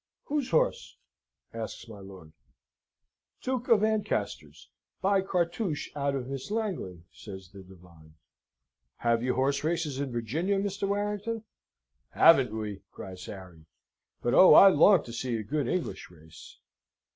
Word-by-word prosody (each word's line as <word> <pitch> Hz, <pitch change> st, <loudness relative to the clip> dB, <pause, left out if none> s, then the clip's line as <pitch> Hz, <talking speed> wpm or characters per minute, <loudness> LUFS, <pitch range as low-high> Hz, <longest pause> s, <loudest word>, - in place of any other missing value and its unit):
"Whose 290 Hz, -3 st, -2 dB
horse?" 160 Hz, -, 0 dB, 0.6 s
asks 115 Hz, +1 st, -7 dB
my 110 Hz, -3 st, -11 dB
lord. 95 Hz, -5 st, -13 dB, 1.1 s
"Duke 255 Hz, -1 st, -2 dB
of 215 Hz, -3 st, +4 dB
Ancaster's. 220 Hz, -1 st, -2 dB, 0.3 s
By 195 Hz, 0 st, +2 dB
Cartouche 175 Hz, -2 st, -2 dB
out 140 Hz, -1 st, -1 dB
of 130 Hz, -2 st, -4 dB
Miss 135 Hz, +3 st, -6 dB
Langley," 195 Hz, -, -4 dB
says 95 Hz, -3 st, -10 dB
the 100 Hz, -1 st, -12 dB
divine. 85 Hz, -4 st, -18 dB, 0.8 s
"Have 115 Hz, -1 st, +1 dB
you 125 Hz, +1 st, -1 dB
horse 140 Hz, +2 st, 0 dB
races 155 Hz, -4 st, -1 dB
in 140 Hz, -2 st, -3 dB
Virginia, 150 Hz, -, -1 dB
Mr. 200 Hz, 0 st, -2 dB
Warrington?" 210 Hz, +2 st, -2 dB, 0.7 s
"Haven't 135 Hz, -8 st, +6 dB
we!" 105 Hz, -3 st, -5 dB
cries 95 Hz, -1 st, -9 dB
Harry; 90 Hz, -5 st, -11 dB, 0.6 s
"but 120 Hz, -, 0 dB
oh! 185 Hz, -, +8 dB
I 195 Hz, -, +10 dB
long 185 Hz, +2 st, +5 dB
to 115 Hz, -, -10 dB
see 120 Hz, 0 st, -2 dB
a 110 Hz, -, -5 dB
good 140 Hz, +4 st, -2 dB
English 180 Hz, +5 st, -3 dB
race!" 80 Hz, -2 st, -15 dB
135 Hz, 135 wpm, -28 LUFS, -, 1.1 s, I